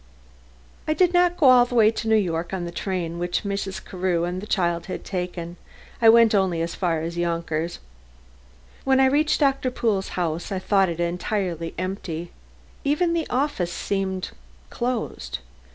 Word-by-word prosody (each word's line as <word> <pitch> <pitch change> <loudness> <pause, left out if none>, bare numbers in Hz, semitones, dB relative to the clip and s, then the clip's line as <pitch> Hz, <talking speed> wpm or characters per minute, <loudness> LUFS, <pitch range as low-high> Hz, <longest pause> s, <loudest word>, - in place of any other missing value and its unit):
I 310 - +1
did 360 0 +3
not 355 0 +3
go 295 - +5
all 250 -1 +8
the 245 - -5
way 220 -2 +6
to 225 0 -5
New 220 - +4
York 175 -3 0
on 175 -2 -3
the 170 - -5
train 170 -2 -3
which 175 0 -1
Mrs. 200 -1 -4
Carew 180 -2 -1
and 180 +1 -2
the 210 - -8
child 170 -4 0
had 185 - -5
taken. 180 -2 -4 0.4
I 225 - +7
went 230 -1 +6
only 190 -4 +2
as 170 - -3
far 170 -4 0
as 170 +1 -4
Yonkers. 170 -1 -2 1.1
When 265 0 +3
I 265 - +6
reached 295 +3 +2
Doctor 275 -2 +2
Pool's 215 -6 -1
house, 170 0 -2
I 195 - -1
thought 195 0 +2
it 170 0 -5
entirely 175 -1 -2
empty. 175 -2 -4 0.5
Even 320 +5 +1
the 335 -1 -1
office 255 -9 0
seemed 190 -1 -2 0.4
closed. 235 - -3
190 Hz, 170 wpm, -24 LUFS, 170-235 Hz, 1.1 s, all